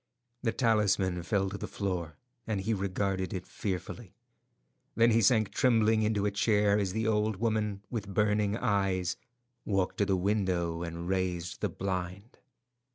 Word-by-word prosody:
The 115 Hz, -, +1 dB
talisman 100 Hz, -7 st, +2 dB
fell 95 Hz, +2 st, 0 dB
to 100 Hz, -, -5 dB
the -, -, -4 dB
floor, 90 Hz, -6 st, -3 dB, 0.3 s
and 105 Hz, -3 st, -1 dB
he 110 Hz, +4 st, 0 dB
regarded 95 Hz, -1 st, -1 dB
it 95 Hz, -, -5 dB
fearfully. 95 Hz, -4 st, -5 dB, 0.8 s
Then 115 Hz, +1 st, +5 dB
he 115 Hz, +1 st, +4 dB
sank 110 Hz, 0 st, +3 dB
trembling 110 Hz, -3 st, +3 dB
into 105 Hz, -1 st, +1 dB
a 105 Hz, -, +1 dB
chair 105 Hz, 0 st, +3 dB
as 95 Hz, -2 st, 0 dB
the 110 Hz, +1 st, -1 dB
old 110 Hz, -1 st, +1 dB
woman, 105 Hz, -2 st, -1 dB
with 105 Hz, -5 st, -4 dB
burning 105 Hz, +1 st, +1 dB
eyes, 95 Hz, -6 st, 0 dB, 0.5 s
walked 95 Hz, -3 st, -1 dB
to 100 Hz, -, +2 dB
the 95 Hz, -2 st, +2 dB
window 90 Hz, -4 st, 0 dB
and 85 Hz, 0 st, -5 dB
raised 90 Hz, -2 st, -2 dB
the -, -, 0 dB
blind. 95 Hz, +3 st, -5 dB
100 Hz, 155 wpm, -30 LUFS, 95-110 Hz, 0.8 s, Then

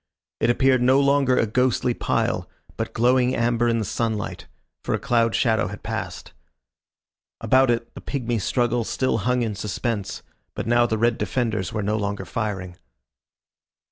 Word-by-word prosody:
It 115 Hz, -, +2 dB
appeared 130 Hz, +1 st, +3 dB
no 130 Hz, +2 st, +4 dB
longer 140 Hz, -2 st, +3 dB
a -, -, +3 dB
ghostly 125 Hz, +2 st, +1 dB
pile, -, -, -1 dB, 0.3 s
but -, -, -3 dB
glowing 125 Hz, +2 st, +2 dB
amber 120 Hz, 0 st, +1 dB
in 115 Hz, -1 st, +2 dB
the 110 Hz, -, -1 dB
sunlight, 110 Hz, 0 st, -3 dB, 0.4 s
for -, -, 0 dB
a -, -, -3 dB
cloud 115 Hz, -1 st, +1 dB
shadow 110 Hz, -5 st, +2 dB
had 105 Hz, +3 st, -9 dB
passed. -, -, -5 dB, 1.1 s
About 130 Hz, 0 st, +3 dB
it 115 Hz, 0 st, -1 dB
the -, -, -10 dB
pigmy 120 Hz, -4 st, -2 dB
struggle 120 Hz, +3 st, 0 dB
still 130 Hz, +1 st, 0 dB
hung 125 Hz, +4 st, +1 dB
in 110 Hz, -2 st, -2 dB
suspense, 105 Hz, +1 st, -3 dB, 0.3 s
but -, -, -4 dB
now 120 Hz, +1 st, +3 dB
the 110 Hz, -, -1 dB
red 115 Hz, +1 st, +1 dB
defenders 110 Hz, -7 st, -1 dB
were 110 Hz, -2 st, -2 dB
no 105 Hz, +2 st, 0 dB
longer 100 Hz, -2 st, -3 dB
firing. 95 Hz, -3 st, -4 dB
115 Hz, 160 wpm, -23 LUFS, 110-125 Hz, 1.1 s, no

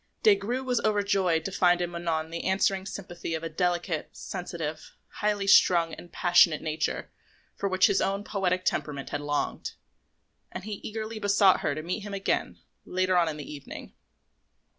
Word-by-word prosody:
Des 430 Hz, -, +8 dB
Grieux 255 Hz, -, -3 dB
was 250 Hz, -2 st, 0 dB
overjoyed 200 Hz, -6 st, +1 dB
to 195 Hz, -, -2 dB
find 180 Hz, -2 st, +3 dB
in 175 Hz, -1 st, -2 dB
Manon 165 Hz, -2 st, -2 dB
the 170 Hz, -, -5 dB
answering 190 Hz, 0 st, +1 dB
sympathy 175 Hz, -4 st, -5 dB
of 160 Hz, -, -5 dB
a 165 Hz, -, -3 dB
delicate, 175 Hz, -1 st, -1 dB
sensitive, 165 Hz, -4 st, -6 dB, 0.3 s
highly 205 Hz, -1 st, +1 dB
strung 170 Hz, -4 st, +5 dB
and 175 Hz, -, -10 dB
passionate 175 Hz, -2 st, +4 dB
nature 155 Hz, 0 st, -2 dB, 0.4 s
for 200 Hz, -, -2 dB
which 185 Hz, 0 st, +4 dB
his 195 Hz, -, +3 dB
own 195 Hz, +1 st, 0 dB
poetic 185 Hz, -3 st, -1 dB
temperament 140 Hz, -2 st, -2 dB
had 145 Hz, -, -2 dB
longed; 145 Hz, 0 st, -2 dB, 0.8 s
and -, -, -6 dB
he 210 Hz, -1 st, -5 dB
eagerly 220 Hz, 0 st, -5 dB
besought 200 Hz, -2 st, +4 dB
her -, -, -1 dB
to 155 Hz, -, -5 dB
meet 180 Hz, +6 st, -2 dB
him 205 Hz, -1 st, -6 dB
again 195 Hz, -, -1 dB, 0.3 s
later 185 Hz, 0 st, 0 dB
on 170 Hz, -2 st, +3 dB
in 155 Hz, -, -5 dB
the 150 Hz, 0 st, -7 dB
evening. 145 Hz, -, -9 dB
180 Hz, 170 wpm, -27 LUFS, 165-200 Hz, 0.8 s, Des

